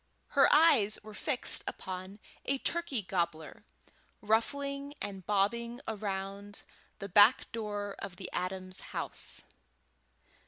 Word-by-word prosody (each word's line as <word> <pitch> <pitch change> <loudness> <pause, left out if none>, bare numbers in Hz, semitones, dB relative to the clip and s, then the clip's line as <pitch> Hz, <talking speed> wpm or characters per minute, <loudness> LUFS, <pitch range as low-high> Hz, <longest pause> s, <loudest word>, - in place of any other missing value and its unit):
Her 275 -1 +5
eyes 280 -10 +5
were 215 0 -10
fixed 255 +4 +1
upon 185 +1 -6 0.3
a 275 - +1
turkey 310 -6 -2
gobbler 170 -3 -3 0.5
ruffling 280 +6 -1
and 195 -2 -5
bobbing 235 +4 +1
around 200 -1 -5 0.3
the 200 - -6
back 205 +5 +6
door 205 -3 -4
of 185 - -6
the 185 - -6
Adams 185 0 -2 0.2
house. - - 0
205 Hz, 110 wpm, -32 LUFS, 190-240 Hz, 0.5 s, back